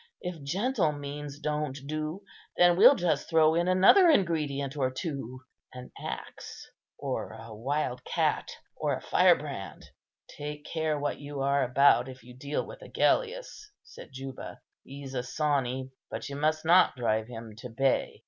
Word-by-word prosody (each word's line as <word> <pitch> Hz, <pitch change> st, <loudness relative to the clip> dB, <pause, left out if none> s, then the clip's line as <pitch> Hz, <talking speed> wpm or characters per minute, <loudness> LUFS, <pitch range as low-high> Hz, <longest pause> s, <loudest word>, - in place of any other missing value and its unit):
If 180 Hz, -3 st, -6 dB
gentle 185 Hz, -, 0 dB
means 145 Hz, 0 st, -7 dB
don't 150 Hz, -2 st, -2 dB
do, 155 Hz, +5 st, -4 dB, 0.3 s
then 175 Hz, 0 st, +6 dB
we'll 235 Hz, +10 st, +8 dB
just 175 Hz, -6 st, -1 dB
throw 160 Hz, -1 st, +4 dB
in 170 Hz, +2 st, +1 dB
another 195 Hz, -, +6 dB
ingredient 150 Hz, -, +1 dB
or 135 Hz, -3 st, +1 dB
two: 130 Hz, -3 st, -5 dB, 0.3 s
an 125 Hz, 0 st, -10 dB
axe, -, -, -8 dB, 0.3 s
or -, -, -4 dB
a 115 Hz, 0 st, -10 dB
wild 125 Hz, +2 st, -2 dB
cat, -, -, 0 dB, 0.3 s
or -, -, -1 dB
a -, -, -11 dB
firebrand." -, -, +1 dB, 0.4 s
"Take 150 Hz, 0 st, -7 dB
care 160 Hz, -2 st, -1 dB
what 145 Hz, 0 st, -2 dB
you 145 Hz, -1 st, -6 dB
are 140 Hz, +1 st, +2 dB
about, 130 Hz, 0 st, +4 dB
if 130 Hz, -1 st, -11 dB
you 125 Hz, +1 st, -13 dB
deal 140 Hz, +3 st, -3 dB
with -, -, -11 dB
Agellius," -, -, -1 dB
said -, -, -13 dB
Juba. 135 Hz, 0 st, -8 dB, 0.2 s
"He's 135 Hz, 0 st, -9 dB
a 125 Hz, -, -1 dB
sawney, 130 Hz, -1 st, -1 dB, 0.2 s
but 135 Hz, -, -5 dB
you 140 Hz, -, -6 dB
must 155 Hz, +2 st, 0 dB
not 175 Hz, 0 st, +5 dB
drive 110 Hz, -3 st, 0 dB
him 115 Hz, -2 st, -9 dB
to 125 Hz, +2 st, -8 dB
bay. 130 Hz, +3 st, 0 dB
145 Hz, 155 wpm, -29 LUFS, 130-160 Hz, 0.4 s, we'll